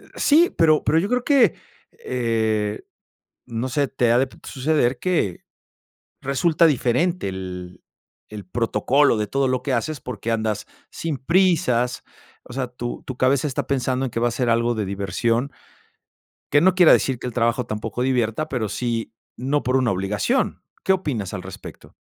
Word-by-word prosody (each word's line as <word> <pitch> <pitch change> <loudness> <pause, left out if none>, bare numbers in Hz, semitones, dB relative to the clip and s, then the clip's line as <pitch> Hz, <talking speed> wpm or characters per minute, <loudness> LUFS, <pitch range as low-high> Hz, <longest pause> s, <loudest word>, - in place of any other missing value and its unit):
sí, 325 +4 +4
pero 155 -2 +4
pero 160 - +2
yo 195 - -1
creo 250 +2 0
que, 260 - +4 0.5
eh, 110 -4 -1 0.7
no 120 +2 -3
sé, 140 +2 0
te 120 -3 +1
ha, 120 - +4
p 135 - +2
de - - -18
suceder 135 -3 +1
que 160 - -1 0.8
resulta 155 +5 +2
diferente 155 - +1
el 90 -1 -7 0.5
el 105 -2 -8
protocolo 120 +5 +2
de 105 - -1
todo 135 +4 0
lo 130 -1 0
que 135 -3 -1
haces, 145 +4 -2
porque, 115 -2 -5
andas 110 -2 -2 0.2
sin 155 -5 -4
prisas, 160 -7 +2 0.4
o - - -12
sea, 130 -1 -1
tu 120 0 -6
tu 130 - -6
cabeza 130 +3 +2
está 135 - -3
pensando 130 -1 0
en - - -5
que 115 - -3
va 120 - +2
a - - -2
ser 125 +1 -1
algo 115 +1 +2
de 110 -2 -2
diversión 110 +7 -1 1.0
que 145 - +6
no 185 +3 +4
quiera 180 -3 +7
decir, 130 -3 +2
que 125 - -6
el 125 - -4
trabajo 115 +1 0
tampoco 110 +2 -4
divierta, 125 +3 0
pero 115 -5 -2
sí, 115 +1 -3 0.2
no 140 +4 -1
por 130 +1 +1
una 125 -3 +2
obligación, 95 +1 -1 0.2
¿qué 190 - +4
opinas 120 - -2
al 90 - -5
respecto? 95 0 -11
125 Hz, 170 wpm, -22 LUFS, 115-145 Hz, 1.0 s, quiera